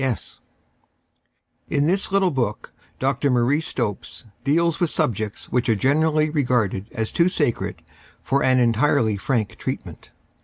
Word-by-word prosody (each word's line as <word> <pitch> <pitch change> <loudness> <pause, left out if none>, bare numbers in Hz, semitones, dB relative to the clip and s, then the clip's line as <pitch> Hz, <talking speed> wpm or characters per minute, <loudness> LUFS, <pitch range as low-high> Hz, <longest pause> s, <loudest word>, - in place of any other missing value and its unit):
b., 135 - +1
b.s. 120 -6 -4 1.3
IN 145 0 +1
this 190 +4 0
little 195 -2 +3
book 120 -7 -3 0.2
Dr. 135 +2 0
Marie 125 +4 +2
Slopes 120 -6 -4 0.2
deals 165 +3 +2
with 175 - +1
subjects 110 -6 -2
which 125 -1 +1
are 115 - +4
generally 155 +6 +2
regarded 120 - 0
as 110 -1 -2
too 170 +1 +3
sacred 145 -9 -1 0.4
for 140 +1 +1
an 130 0 +3
entirely 120 -1 +2
frank 110 0 -2
treatment. - - -6
130 Hz, 140 wpm, -22 LUFS, 115-155 Hz, 1.3 s, are